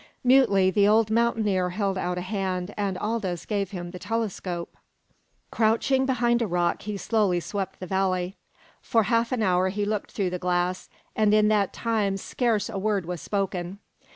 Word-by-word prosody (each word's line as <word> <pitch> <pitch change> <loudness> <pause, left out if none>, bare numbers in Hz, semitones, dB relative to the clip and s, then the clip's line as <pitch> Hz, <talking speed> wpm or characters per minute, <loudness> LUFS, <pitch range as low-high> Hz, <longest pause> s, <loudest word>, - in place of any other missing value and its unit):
Mutely 235 -8 +5
the 200 +2 +4
old 220 +1 +3
mountaineer 220 -5 +1
held 195 +1 -1
out 180 -1 -2
a - - -2
hand, 185 -1 -3
and 200 -3 -2
Aldous 210 -5 -2
gave 200 -3 -1
him 175 -3 -6
the 180 - -8
telescope. 190 -6 -3 0.8
Crouching 235 +4 +2
behind 240 -2 +2
a 230 - +1
rock 175 -1 0
he 210 0 -4
slowly 200 -4 +1
swept 195 +1 -4
the 185 - -5
valley. 185 0 -1 0.5
For 225 -3 +2
half 230 +2 +1
an 245 -4 0
hour 185 -1 +2
he 205 +2 -2
looked 210 -1 -3
through 190 -4 -1
the 180 - -3
glass, 180 0 -1 0.3
and 215 -1 +3
in 210 0 +4
that 205 -3 +2
time 215 -4 -1
scarce 225 +1 0
a 210 -4 -4
word 200 -3 0
was 175 -1 -5
spoken. 190 -2 -3
200 Hz, 175 wpm, -26 LUFS, 185-220 Hz, 0.8 s, Mutely